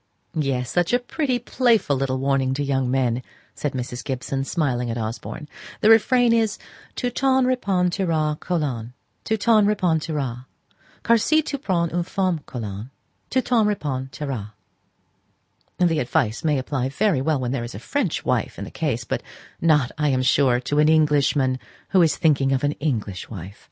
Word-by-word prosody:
'" -, -, -45 dB
"Yes; 135 Hz, -5 st, -1 dB
such 175 Hz, +4 st, +1 dB
a 245 Hz, -, +4 dB
pretty, 255 Hz, +1 st, -1 dB
playful 235 Hz, -, +2 dB
little 130 Hz, 0 st, -1 dB
warning 135 Hz, -1 st, +1 dB
to 145 Hz, -, -1 dB
young 135 Hz, -2 st, 0 dB
men," 125 Hz, -2 st, +1 dB, 0.3 s
said 145 Hz, -, -3 dB
Mrs. 125 Hz, -1 st, -4 dB
Gibson, 135 Hz, +1 st, -3 dB
smiling 130 Hz, -6 st, -1 dB
up 115 Hz, -, -2 dB
at 115 Hz, -, -2 dB
Osborne. 115 Hz, +7 st, -6 dB, 0.3 s
"The 215 Hz, -, +6 dB
refrain 240 Hz, +2 st, +5 dB
is 225 Hz, -2 st, +1 dB, 0.4 s
Tu 245 Hz, -1 st, -2 dB
t'en 265 Hz, +1 st, +2 dB
repentiras, 180 Hz, -9 st, 0 dB
Colin, 130 Hz, -9 st, -2 dB, 0.3 s
Tu 220 Hz, -, 0 dB
t'en 220 Hz, 0 st, +4 dB
repentiras, 155 Hz, -, -1 dB, 0.6 s
Car 235 Hz, -1 st, +4 dB
si 310 Hz, +7 st, +3 dB
tu 280 Hz, -2 st, -4 dB
prends 175 Hz, -9 st, 0 dB
une 175 Hz, -, +1 dB
femme, 185 Hz, -1 st, -1 dB
Colin, 110 Hz, -1 st, -6 dB, 0.4 s
Tu 260 Hz, -, +2 dB
t'en 235 Hz, -3 st, +3 dB
repentiras. 130 Hz, -, -3 dB, 1.2 s
The 170 Hz, -3 st, +2 dB
advice 125 Hz, -1 st, 0 dB
may 150 Hz, -3 st, +2 dB
apply 130 Hz, 0 st, -2 dB
very 185 Hz, -1 st, +1 dB
well 150 Hz, 0 st, +1 dB
when 125 Hz, -1 st, -2 dB
there 130 Hz, -3 st, -2 dB
is 120 Hz, -, -7 dB
a -, -, -6 dB
French -, -, -2 dB
wife -, -, 0 dB
in -, -, -5 dB
the -, -, -10 dB
case; -, -, -2 dB
but -, -, -3 dB, 0.4 s
not, 150 Hz, -6 st, +3 dB
I 150 Hz, -1 st, +2 dB
am 130 Hz, -1 st, +1 dB
sure, 130 Hz, -1 st, +3 dB
to 145 Hz, +3 st, 0 dB
an 150 Hz, +1 st, +5 dB
Englishman 145 Hz, -4 st, +3 dB, 0.3 s
who 190 Hz, -, +4 dB
is 165 Hz, -2 st, +3 dB
thinking 140 Hz, -5 st, +2 dB
of 130 Hz, -, 0 dB
an 145 Hz, -, +2 dB
English 110 Hz, -10 st, -3 dB
wife." 100 Hz, -1 st, -9 dB
145 Hz, 170 wpm, -23 LUFS, 130-185 Hz, 1.2 s, The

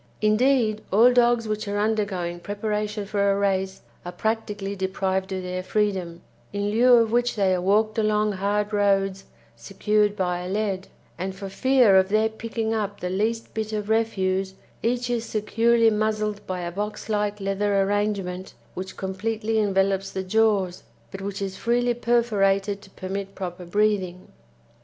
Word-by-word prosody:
Indeed, 215 Hz, 0 st, +2 dB
all 230 Hz, +6 st, +6 dB
dogs 240 Hz, -2 st, +3 dB
which 215 Hz, 0 st, -3 dB
are 200 Hz, 0 st, -2 dB
undergoing 200 Hz, -5 st, -1 dB
preparation 210 Hz, +1 st, -3 dB
for 200 Hz, 0 st, +1 dB
a 195 Hz, -, +1 dB
race 190 Hz, -1 st, 0 dB, 0.2 s
are 175 Hz, -, -6 dB
practically 210 Hz, 0 st, -2 dB
deprived 190 Hz, 0 st, -1 dB
of 185 Hz, -1 st, -3 dB
their 180 Hz, 0 st, -3 dB
freedom, 185 Hz, -3 st, -1 dB, 0.3 s
in 205 Hz, 0 st, -2 dB
lieu 245 Hz, +3 st, +5 dB
of 230 Hz, -2 st, +3 dB
which 240 Hz, +1 st, +1 dB
they 195 Hz, -3 st, +2 dB
are 180 Hz, -, 0 dB
walked 215 Hz, +4 st, +2 dB
along 215 Hz, 0 st, +2 dB
hard 205 Hz, +2 st, -1 dB
roads 195 Hz, -1 st, +1 dB, 0.3 s
secured 210 Hz, +1 st, 0 dB
by 180 Hz, -3 st, -1 dB
a 180 Hz, +1 st, -5 dB
lead; 195 Hz, -2 st, -2 dB, 0.3 s
and 190 Hz, +1 st, -3 dB
for 195 Hz, 0 st, -7 dB
fear 245 Hz, -1 st, +4 dB
of 190 Hz, 0 st, +3 dB
their 215 Hz, +2 st, +2 dB
picking 225 Hz, 0 st, -3 dB
up 205 Hz, -2 st, -2 dB
the 180 Hz, -, -3 dB
least 225 Hz, +4 st, -1 dB
bit 220 Hz, 0 st, -3 dB
of 210 Hz, 0 st, -3 dB
refuse 190 Hz, -4 st, 0 dB, 0.3 s
each 245 Hz, +1 st, 0 dB
is 235 Hz, -2 st, 0 dB
securely 230 Hz, +1 st, +2 dB
muzzled 215 Hz, -1 st, -1 dB
by 185 Hz, -1 st, -3 dB
a 175 Hz, 0 st, -4 dB
box 210 Hz, +3 st, -4 dB
like 210 Hz, -1 st, -1 dB
leather 200 Hz, +1 st, 0 dB
arrangement 195 Hz, -2 st, -2 dB, 0.2 s
which 190 Hz, +1 st, -7 dB
completely 220 Hz, +3 st, -2 dB
envelops 195 Hz, -1 st, +1 dB
the 190 Hz, -, -4 dB
jaws, 195 Hz, -2 st, +1 dB, 0.3 s
but 195 Hz, -, -7 dB
which 200 Hz, 0 st, -4 dB
is 190 Hz, -1 st, -5 dB
freely 240 Hz, +1 st, +1 dB
perforated 205 Hz, -4 st, +1 dB
to 195 Hz, -, -15 dB
permit 195 Hz, +1 st, -6 dB
proper 180 Hz, -1 st, -6 dB
breathing. 190 Hz, -1 st, 0 dB
205 Hz, 160 wpm, -24 LUFS, 190-220 Hz, 0.3 s, all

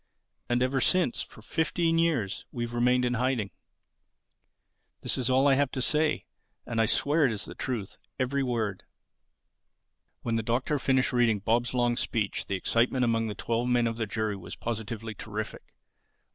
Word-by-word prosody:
And 120 Hz, +1 st, +2 dB
ever 130 Hz, +1 st, +1 dB
since, 185 Hz, -6 st, +2 dB
for 110 Hz, -, -10 dB
fifteen 165 Hz, +4 st, +1 dB
years, 140 Hz, -, 0 dB
we've 120 Hz, -1 st, -4 dB
remained 125 Hz, +1 st, +3 dB
in 125 Hz, -, +1 dB
hiding. 125 Hz, -4 st, 0 dB, 1.5 s
This -, -, 0 dB
is 130 Hz, -2 st, -1 dB
all 130 Hz, +2 st, +4 dB
I 140 Hz, -, +6 dB
have 140 Hz, 0 st, +2 dB
to -, -, -2 dB
say. 150 Hz, +4 st, +1 dB, 0.4 s
And 115 Hz, -1 st, 0 dB
I 110 Hz, -, +3 dB
swear 150 Hz, +7 st, +3 dB
it -, -, -1 dB
is 105 Hz, -1 st, -3 dB
the -, -, -8 dB
truth, 115 Hz, -7 st, -4 dB, 0.2 s
every 135 Hz, +2 st, +1 dB
word." 115 Hz, -7 st, -1 dB, 1.4 s
When 115 Hz, -1 st, 0 dB
the -, -, +1 dB
Doctor 125 Hz, +6 st, 0 dB
finished 130 Hz, -1 st, +2 dB
reading 120 Hz, -3 st, +3 dB
Bob's 115 Hz, +4 st, 0 dB
long 120 Hz, -1 st, +2 dB
speech 110 Hz, -6 st, -1 dB
the 100 Hz, -, -1 dB
excitement 120 Hz, +6 st, +2 dB
among 115 Hz, -1 st, +1 dB
the 105 Hz, -, -4 dB
twelve 120 Hz, +1 st, -1 dB
men 120 Hz, -1 st, +3 dB
of 115 Hz, -1 st, -1 dB
the 115 Hz, -2 st, -2 dB
jury 110 Hz, 0 st, -1 dB
was 95 Hz, -, -8 dB
positively 115 Hz, -1 st, -4 dB
terrific. 105 Hz, 0 st, -6 dB
120 Hz, 170 wpm, -28 LUFS, 110-130 Hz, 1.5 s, I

